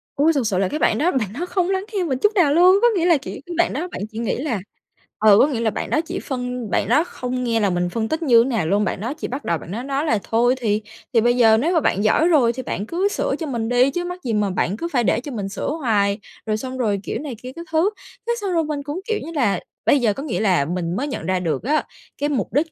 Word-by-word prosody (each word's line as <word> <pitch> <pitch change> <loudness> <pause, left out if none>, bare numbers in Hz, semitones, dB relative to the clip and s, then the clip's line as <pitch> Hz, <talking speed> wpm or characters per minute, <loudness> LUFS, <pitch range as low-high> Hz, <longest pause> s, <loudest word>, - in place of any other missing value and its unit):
Ôi, 300 +3 +4
thực 270 -7 0
sự 195 -4 0
là 190 0 +2
cái 300 - -3
bạn - - +2
đó 340 +5 +2
bạn 215 - -2
đó 350 - -1
không 360 0 0
lắng 385 0 -1
nghe 390 -3 0
mình 265 -7 -1
chút 420 - +3
nào 325 -7 +4
luôn. 360 +4 +6
Có 480 - +6
nghĩa 345 -3 +1
là 340 -3 +5
chỉ 270 - -8
cái 345 - -6
bạn - - +2
đó 315 +7 -3
bạn - - -6
chỉ 220 - -9
nghĩ 235 - -1
là 255 -6 -2 0.6
ờ, 210 -2 +6
có - - +6
nghĩa 265 -6 -2
là 230 -1 +1
bạn - - -4
đó 310 - +2
chỉ 345 +3 -5
phân 250 -3 -4
bạn 195 - 0
đó 295 +7 +4
không 250 -7 -4
nghe 230 -2 +1
là 205 -2 +2
mình 175 -1 0
phân 220 +3 -2
tích 315 +1 -2
như 235 -6 +6
thế 255 - -2
nào 225 -10 0
luôn. 200 +4 +2
Bạn 195 - -2
đó 235 +6 -2
chỉ 310 - -5
bắt 265 +4 -6
đầu 170 - +1
bạn 165 - -10
đó 230 +5 -4
nói 275 +2 -1
là: 225 -9 +2
"Thôi 240 +3 +2
thì 215 -4 0 0.3
thì 230 - +5
bây 240 +2 +3
giờ 225 -2 +6
nếu 315 +10 +1
mà 330 - +4
bạn 200 - +1
giỏi 295 +9 +3
rồi 270 -9 +4
thì 260 +2 -6
bạn 205 - -3
cứ 350 - 0
sửa - - -1
cho 320 - -3
mình 230 -4 -2
đi, 245 +2 +4
chứ 350 +5 -2
mắc 360 +1 -6
gì 235 - -2
mà 210 -1 +1
bạn 190 +1 -1
cứ 335 - -3
phải 245 -3 +2
để 220 - +2
cho 285 - -7
mình 205 -5 -4
sửa 195 - -4
hoài?" 220 -9 +1 0.3
Rồi 215 -1 0
xong 260 +3 -6
rồi 210 -5 0
kiểu - - -3
này 285 -4 -6
kia 255 - -6
các 335 - -8
thứ, 325 +5 +3 0.4
thế 475 - +2
xong 390 -3 -2
rồi 330 -1 +2
mình 295 -2 -3
cũng, 290 +5 -4
kiểu 445 -1 0
như 325 - -7
là, 235 -9 +2 0.3
bây 285 - +5
giờ 220 -4 +2
có 275 - -6
nghĩa 285 -7 -2
là 185 -9 +2
mình 175 +1 -2
mới 275 +8 -2
nhận 280 - -5
ra 185 -1 +1
được 165 -3 -2
á 300 +6 +1 0.3
cái 290 - -1
mục 245 -9 -2
đích 305 +4 +1
255 Hz, 305 wpm, -21 LUFS, 215-310 Hz, 0.6 s, luôn